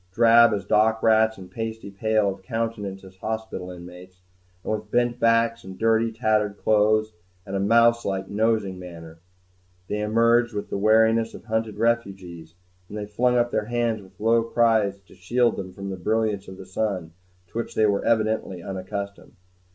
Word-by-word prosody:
Drab 115 Hz, +2 st, +6 dB
as 100 Hz, -2 st, -2 dB
dock 110 Hz, +2 st, +2 dB
rats, 110 Hz, 0 st, +4 dB
and 95 Hz, -2 st, -12 dB
pasty 110 Hz, -1 st, -5 dB
pale 110 Hz, +1 st, +1 dB
of 95 Hz, -, -16 dB
countenance 105 Hz, -2 st, -4 dB
as 95 Hz, 0 st, -15 dB
hospital 110 Hz, -3 st, -5 dB
inmates, 90 Hz, +1 st, -12 dB, 0.4 s
and -, -, -2 dB
with 105 Hz, -1 st, -5 dB
bent 120 Hz, +1 st, +1 dB
backs 115 Hz, 0 st, +2 dB
and 95 Hz, 0 st, -10 dB
dirty, 115 Hz, 0 st, +2 dB
tattered 110 Hz, -3 st, 0 dB
clothes 110 Hz, +1 st, +2 dB, 0.3 s
and 100 Hz, -1 st, -5 dB
a -, -, 0 dB
mouse 115 Hz, +3 st, +4 dB
like 95 Hz, -1 st, -3 dB
nosing 105 Hz, -3 st, 0 dB
manner, 85 Hz, -2 st, -11 dB, 0.7 s
they 105 Hz, -, -2 dB
emerged 115 Hz, +2 st, +2 dB
with 105 Hz, 0 st, -5 dB
the -, -, -1 dB
wariness 110 Hz, +2 st, +3 dB
of -, -, -12 dB
hunted 110 Hz, -1 st, -2 dB
refugees; 95 Hz, -8 st, -2 dB, 0.3 s
and 105 Hz, -, -7 dB
they 105 Hz, -, -4 dB
flung 125 Hz, +4 st, +1 dB
up 120 Hz, 0 st, +1 dB
their -, -, -1 dB
hands 120 Hz, -2 st, -1 dB
with 95 Hz, -1 st, -19 dB
low 115 Hz, +2 st, +3 dB
cries 115 Hz, -3 st, +2 dB
to 95 Hz, -, -20 dB
shield 120 Hz, +7 st, +1 dB
them 95 Hz, -1 st, -6 dB
from 100 Hz, +1 st, -7 dB
the 95 Hz, -, -5 dB
brilliance 105 Hz, +1 st, -1 dB
of 95 Hz, -, -10 dB
the 95 Hz, -, -10 dB
sun, 95 Hz, -3 st, -3 dB, 0.4 s
to 115 Hz, -, -4 dB
which 115 Hz, -, -5 dB
they 110 Hz, -, +3 dB
were 100 Hz, -1 st, +1 dB
evidently 110 Hz, -5 st, 0 dB
unaccustomed. 100 Hz, +1 st, -6 dB
110 Hz, 175 wpm, -24 LUFS, 95-115 Hz, 0.7 s, Drab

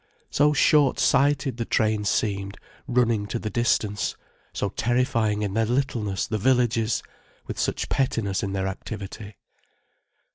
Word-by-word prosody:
So 150 Hz, +1 st, +4 dB
shortsighted 140 Hz, -2 st, +3 dB
the 120 Hz, -, -1 dB
train 110 Hz, -2 st, +1 dB
seemed, 100 Hz, -1 st, -1 dB, 0.3 s
running 120 Hz, -4 st, +1 dB
to 120 Hz, -, -3 dB
the 110 Hz, -2 st, -4 dB
distance, 110 Hz, -4 st, 0 dB, 0.4 s
so -, -, -2 dB
terrifying 115 Hz, -3 st, 0 dB
in 100 Hz, -2 st, -2 dB
their 110 Hz, +1 st, +1 dB
littleness 115 Hz, -6 st, -1 dB
the 110 Hz, -, -2 dB
villages, 120 Hz, -2 st, +2 dB, 0.4 s
with -, -, -6 dB
such -, -, -1 dB
pettiness 115 Hz, -7 st, 0 dB
in 100 Hz, -1 st, -3 dB
their 95 Hz, -1 st, -1 dB
activity. 100 Hz, +1 st, -7 dB
110 Hz, 130 wpm, -25 LUFS, 105-125 Hz, 0.4 s, So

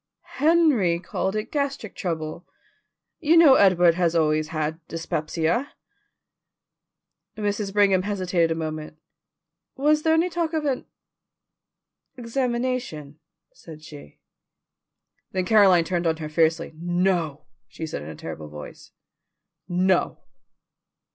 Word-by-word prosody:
"Henry 295 Hz, -, +3 dB
called 190 Hz, +3 st, -3 dB
it 215 Hz, +1 st, -4 dB
gastric 280 Hz, -7 st, -3 dB
trouble. 165 Hz, -1 st, -4 dB, 0.7 s
You 330 Hz, 0 st, +3 dB
know 320 Hz, -5 st, +8 dB
Edward 180 Hz, -7 st, +5 dB
has 170 Hz, -1 st, 0 dB
always 155 Hz, -1 st, +2 dB
had 155 Hz, 0 st, -3 dB
dyspepsia." 165 Hz, -, -2 dB, 1.6 s
Mrs. 205 Hz, -1 st, -2 dB
Brigham 195 Hz, -2 st, +3 dB
hesitated 185 Hz, -4 st, 0 dB
a 165 Hz, -, -1 dB
moment. 155 Hz, -1 st, -5 dB, 0.8 s
"Was 300 Hz, +3 st, +2 dB
there 320 Hz, +1 st, +3 dB
any 330 Hz, +2 st, +2 dB
talk 335 Hz, -1 st, -2 dB
of 310 Hz, -2 st, -1 dB
an 270 Hz, -3 st, -2 dB, 1.3 s
examination?" 240 Hz, -, -3 dB, 0.3 s
said 160 Hz, -, -13 dB
she. 145 Hz, -, -13 dB, 1.2 s
Then 185 Hz, -1 st, -1 dB
Caroline 190 Hz, -4 st, +5 dB
turned 175 Hz, 0 st, -1 dB
on 160 Hz, -1 st, +1 dB
her 155 Hz, -1 st, -6 dB
fiercely. 160 Hz, +1 st, +1 dB
"No," 175 Hz, -4 st, -1 dB, 0.2 s
said 160 Hz, -, -6 dB
she -, -, -4 dB
in 70 Hz, -, -7 dB
a 80 Hz, -, -8 dB
terrible 80 Hz, 0 st, -8 dB
voice. 75 Hz, 0 st, -11 dB, 0.8 s
"No." 185 Hz, +1 st, +1 dB
180 Hz, 115 wpm, -24 LUFS, 160-240 Hz, 1.6 s, know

